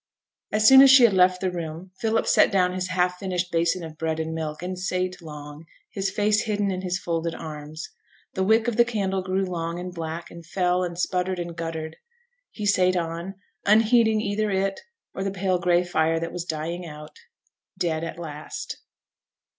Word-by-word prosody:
As 215 0 +3
soon 265 +2 +10
as 275 - +8
she 265 -1 +8
had 230 -4 +6
left 185 0 +4
the 185 -1 0
room, 170 +1 -6
Philip 225 0 +1
set - - +4
down 180 -2 +2
his 185 0 -2
half 180 0 0
finished 180 -2 -2
basin 170 +1 +1
of 160 -1 -9
bread 160 -1 -1
and 160 0 -3
milk, 160 0 -4
and 180 0 -4
sate 185 0 -2
long, 150 0 -10 0.2
his 195 -1 -1
face 210 +1 +2
hidden 205 -2 0
in 185 0 -3
his 180 -1 -1
folded 170 -2 -2
arms. 155 +1 -7 0.5
The 190 - 0
wick 220 +3 +3
of 235 -2 -1
the 235 - +7
candle 200 -5 -1
grew 190 +1 -1
long 170 -2 -3
and 180 0 -6
black, 165 0 -6
and 170 0 -11
fell, 180 +1 0
and 175 -1 -4
sputtered, 180 +1 -1
and 170 -1 -5
guttered; 160 -1 -5 0.5
he 210 - -6
sate 185 -2 +3
on, 170 +2 -3 0.3
unheeding 220 +1 +4
either 215 0 -1
it 195 0 0 0.3
or 190 - -4
the 195 - -1
pale 190 -1 0
gray 175 0 +3
fire 165 -2 +1
that 165 0 -4
was 175 -1 -4
dying 165 +2 -4
out 150 - -10 0.6
dead 160 -2 -1
at 165 - -5
last. 155 -3 -7
180 Hz, 190 wpm, -25 LUFS, 165-195 Hz, 0.6 s, soon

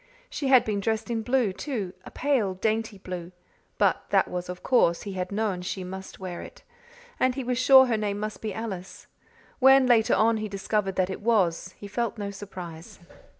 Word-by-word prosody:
She 280 - -3
had 260 -2 +6
been 210 -2 -1
dressed 220 +3 -1
in 225 -1 -1
blue, 245 -4 +1
too 205 -6 -4
a - - -10
pale, 250 -10 0
dainty 220 +1 -1
blue; 180 -2 -7 0.5
but - - +2
that - - +3
was 180 0 -5
of 180 0 -7
course; 170 -10 +3
he 200 - -6
had 185 0 -4
known 200 -3 -1
she 185 +1 -4
must 190 +1 -8
wear 180 -2 -6
it; - - -12 0.6
and 255 -1 +2
he 270 - -3
was 250 0 -1
sure 265 0 +8
her 235 -3 0
name 205 -1 -2
must 215 0 -5
be 220 - -3
Alice. 195 -3 -6 0.5
When, 270 0 +7
later 235 -3 +4
on, 225 +1 +3
he 215 0 -4
discovered 195 0 -1
that 185 0 +1
it 190 - -6
was, 185 -5 +1
he 205 - -9
felt 235 +2 -2
no 200 -1 -4
surprise. 180 -5 -9
210 Hz, 195 wpm, -26 LUFS, 185-235 Hz, 0.6 s, sure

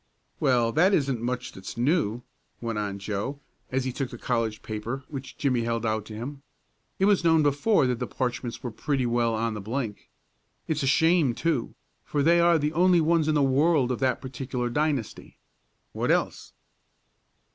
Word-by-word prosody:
"Well, 120 -3 +2
that 180 - +4
isn't 135 -5 0
much 125 +1 -3
that's 95 +4 -9
new," 125 - +1 0.4
went 115 -2 -3
on 100 -1 -3
Joe, 105 +8 -4 0.3
as 130 0 0
he 130 - -1
took 130 0 -3
the 120 - -9
college 115 -3 -2
paper 115 +5 -4
which 135 -2 -7
Jimmie 125 -4 +1
held 115 0 -1
out 110 -1 -1
to 110 - -9
him. 135 +5 -6 0.6
"It 190 - +2
was 200 -3 +3
known 160 -2 +4
before 145 +5 +3
that 125 -2 0
the 125 - -2
parchments 125 0 -3
were 120 - -3
pretty 135 +2 -1
well 120 -1 +1
on 115 0 -1
the 105 - -5
blink. 110 0 -4 0.6
It's 155 -1 -1
a 135 - 0
shame, 160 -2 +3
too, 160 -8 -1 0.3
for 145 -1 -1
they 170 +3 +5
are 170 0 +5
the 150 0 -1
only 180 +1 +4
ones 165 -1 +2
in 155 - +2
the 145 - +3
world 135 0 +3
of 125 - -2
that 130 -2 +1
particular 125 -2 -4
dynasty. 145 -3 -2 0.5
What - - -2
else?" - - 0
130 Hz, 180 wpm, -26 LUFS, 115-150 Hz, 0.6 s, they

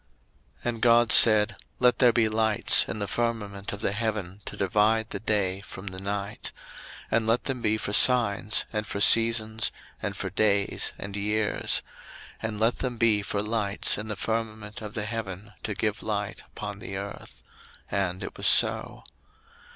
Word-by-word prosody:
01:001:014 - - -1
And 115 -2 -5
God 120 -1 +4
said, 105 -2 +7 0.2
Let 125 -1 +3
there 125 -2 +6
be 115 -1 +2
lights 110 -1 +3
in - - -4
the 100 -1 -4
firmament 105 -4 -3
of 105 - -6
the - - -1
heaven 105 -3 -4
to - - -7
divide 105 +4 +1
the - - -4
day 100 -3 -1
from 95 0 -11
the 95 -1 -6
night; 100 +1 -4 0.6
and 115 -1 +1
let 115 +2 +1
them 130 -2 -3
be 110 -1 +1
for 100 - -5
signs, 110 -4 +4
and 105 -1 -3
for 100 - -4
seasons, 110 0 +4 0.3
and 100 -1 -4
for 95 - -4
days, 100 0 0
and 100 0 -7
years: 105 +1 +1 0.6
01:001:015 - - -2
And 105 -1 -7
let 115 +2 +1
them 125 -2 -3
be 110 -3 +3
for 100 0 -3
lights 105 -2 0
in 105 - -5
the 105 - -4
firmament 110 +1 -4
of 105 +1 -8
the 105 -2 -3
heaven 105 -2 -6
to 105 -3 -4
give 105 +2 -2
light 105 -1 -4
upon 100 0 -7
the 95 -1 -7
earth: 100 -11 -9 0.5
and 95 -2 -2
it - - -7
was - - +1
so. - - +3
105 Hz, 175 wpm, -26 LUFS, 100-115 Hz, 0.6 s, said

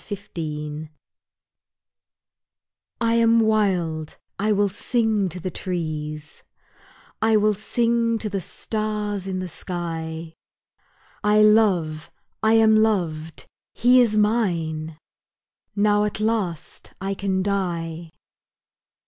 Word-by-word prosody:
JOY 155 -6 -5 2.1
I 230 -1 +2
AM 230 0 +4
wild, 185 -8 0 0.2
I 210 +2 +1
will 205 0 +3
sing 215 0 0
to 180 - -6
the 185 +2 -4
trees, 155 -4 -5 0.8
I 220 0 +4
will 210 0 +3
sing 230 +2 +1
to 220 - -3
the 195 -2 -3
stars 210 0 -3
in 190 -1 -2
the 185 0 -3
sky, 165 -2 -5 0.9
I 210 +1 +5
love, 185 -8 +3 0.3
I 220 0 +3
am 220 -1 +5
loved, 170 -8 0 0.3
he 250 +1 +5
is 220 -3 +2
mine, 165 -8 0 0.8
Now 205 0 +3
at 210 - -3
last 215 -7 -3
I 195 +1 -2
can 190 -1 -1
die! 170 -4 -2
195 Hz, 105 wpm, -23 LUFS, 165-215 Hz, 2.1 s, I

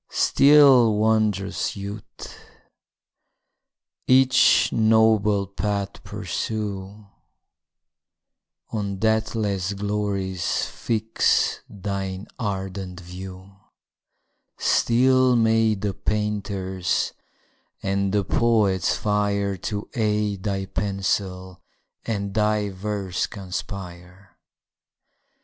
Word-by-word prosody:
Still, 135 -6 +5
wond'rous 105 -2 0
youth! 100 +1 -6 2.1
each 130 0 +5
noble 110 -2 +3
path 100 +1 -3
pursue, 105 -1 -5 1.7
On 100 -3 -3
deathless 110 -3 0
glories 100 -3 -2
fix 110 -1 0
thine 95 -1 -4
ardent 95 -3 -4
view: 95 +2 -10 1.0
Still 130 +1 +3
may 115 -1 +3
the 100 0 -3
painter's 100 -4 -2 0.7
and 100 0 0
the 100 0 +1
poet's 100 -3 +2
fire 100 -1 0
To 105 +3 -5
aid 105 -4 0
thy 95 -1 -2
pencil, 95 -1 -3 0.5
and 100 -3 -2
thy 105 -1 +1
verse 95 -1 -3
conspire! 90 -2 -8
100 Hz, 70 wpm, -23 LUFS, 95-110 Hz, 2.1 s, Still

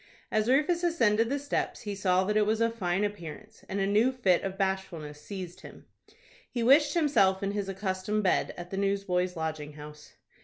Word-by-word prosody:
As 215 +1 +1
Rufus 305 +6 +2
ascended 230 -10 +2
the 280 - 0
steps, 285 0 -2
he 205 -3 -4
saw 185 -2 +2
that 210 +2 -1
it 210 -1 +3
was 220 +1 +1
of 230 0 +2
fine 190 -3 -1
appearance, 175 -8 -6
and 200 - -2
a 195 - +1
new 215 +6 +3
fit 195 -9 +2
of 195 0 -4
bashfulness 185 -6 -3
seized 185 -2 -7
him. - - -13 0.6
He 240 -2 -2
wished 290 +7 +5
himself 200 - +3
in 195 - 0
his 200 -1 -3
accustomed 195 +2 -2
bed 185 - +2
at 175 0 -8
the 195 - -3
Newsboys' 195 -2 0
Lodging 155 -2 -4
House. 150 0 -12
195 Hz, 190 wpm, -29 LUFS, 180-225 Hz, 0.6 s, wished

